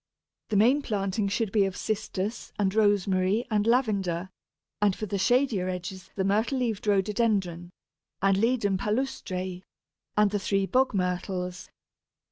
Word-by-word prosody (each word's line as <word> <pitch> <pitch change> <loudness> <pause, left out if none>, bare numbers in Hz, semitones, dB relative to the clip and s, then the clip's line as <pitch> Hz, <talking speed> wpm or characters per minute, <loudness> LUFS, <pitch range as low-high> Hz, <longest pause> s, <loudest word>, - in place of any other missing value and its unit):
The 215 - -1
main 245 +8 +4
planting 200 -3 -1
should 205 +1 -1
be 210 -1 +3
of 190 -1 -4
Cistus 215 0 -3
and 195 -2 +1
Rosemary 205 0 +2
and 210 0 +1
Lavender, 195 -7 +1 0.5
and 205 -2 +3
for 215 - -4
the 200 -1 -3
shadier 235 -4 +2
edges 180 +1 -6
the 195 - 0
Myrtle 215 +7 +1
leaved 225 -5 -2
Rhododendron, 195 -4 +1 0.5
and 195 0 +3
Ledum 205 -2 +1
palustre, 190 -6 -2 0.6
and 210 -1 +4
the 205 - 0
three 195 0 0
Bog 255 +2 +2
myrtles. 180 -1 -2
200 Hz, 135 wpm, -27 LUFS, 185-220 Hz, 0.6 s, main